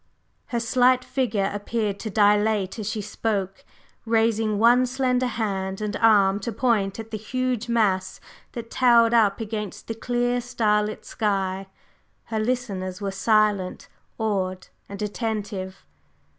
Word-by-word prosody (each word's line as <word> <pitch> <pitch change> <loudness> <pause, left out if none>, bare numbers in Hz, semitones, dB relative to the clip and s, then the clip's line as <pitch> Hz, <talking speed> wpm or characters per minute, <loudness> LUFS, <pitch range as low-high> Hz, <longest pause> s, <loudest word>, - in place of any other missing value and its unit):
Her 240 - -1
slight 250 +2 +3
figure 215 -7 0
appeared 205 -1 -2
to 220 - -4
dilate 210 0 +2
as 210 -1 -3
she 215 -1 -3
spoke, 200 -2 -3 0.4
raising 225 -2 +1
one 240 +4 +5
slender 255 0 0
hand 195 -4 -2
and 210 0 -3
arm 200 -3 +4
to 225 +3 -4
point 210 -4 0
at 225 0 -8
the 215 - -4
huge 245 +1 -2
mass 205 -5 +1 0.3
that 230 -2 -7
towered 235 -2 +5
up 210 -4 +3
against 210 -3 -5
the 225 - -2
clear, 245 +1 -1
starlit 215 -3 0
sky. 195 -3 -1 0.6
Her 220 - -3
listeners 205 -6 -2
were 200 -1 -3
silent, 205 -2 +1 0.3
awed 190 -4 -2 0.2
and 200 0 -7
attentive. 205 -3 -4
215 Hz, 130 wpm, -24 LUFS, 200-235 Hz, 0.6 s, one